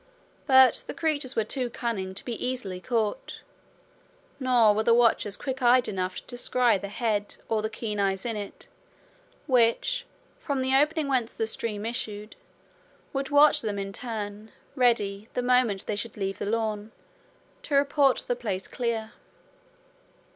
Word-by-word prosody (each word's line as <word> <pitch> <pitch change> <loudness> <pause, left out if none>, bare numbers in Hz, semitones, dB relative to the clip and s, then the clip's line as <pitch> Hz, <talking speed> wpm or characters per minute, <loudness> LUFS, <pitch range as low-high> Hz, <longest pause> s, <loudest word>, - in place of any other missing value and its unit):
But 260 -3 +6
the - - -6
creatures 290 -5 -1
were 225 - +2
too 250 +3 -2
cunning 210 -6 -3
to - - -5
be 235 -3 -4
easily 245 -8 -3
caught; 220 +1 -2 1.0
nor 245 -5 +4
were 215 - +1
the 230 +1 +4
watchers 230 -4 +2
quick 265 -1 -4
eyed 245 0 +5
enough 185 -2 -3
to - - -6
descry 245 -3 +1
the 200 - -6
head, 205 -1 -2
or 220 -1 0
the 215 - -2
keen 215 -1 -4
eyes 195 0 0
in 230 -2 -1
it, 205 -1 -7 0.8
which, 270 - +2 0.3
from 280 -4 -2
the 260 +1 +2
opening 300 +2 +2
whence 255 -4 0
the 225 - -1
stream 220 -1 -3
issued, 215 -2 -4 0.8
would 275 0 -2
watch 290 +1 +6
them 210 -3 -3
in 195 0 -4
turn, 215 -2 -6 0.2
ready, 220 -5 +1
the 250 - 0
moment 245 -6 +2
they 210 - -2
should 215 +2 -5
leave 195 -1 -3
the 200 - -2
lawn, 215 -1 -2 0.7
to 290 - -2
report 280 -1 +3
the 245 - 0
place 205 -6 -4
clear. 230 -3 -3
230 Hz, 155 wpm, -27 LUFS, 205-255 Hz, 1.0 s, But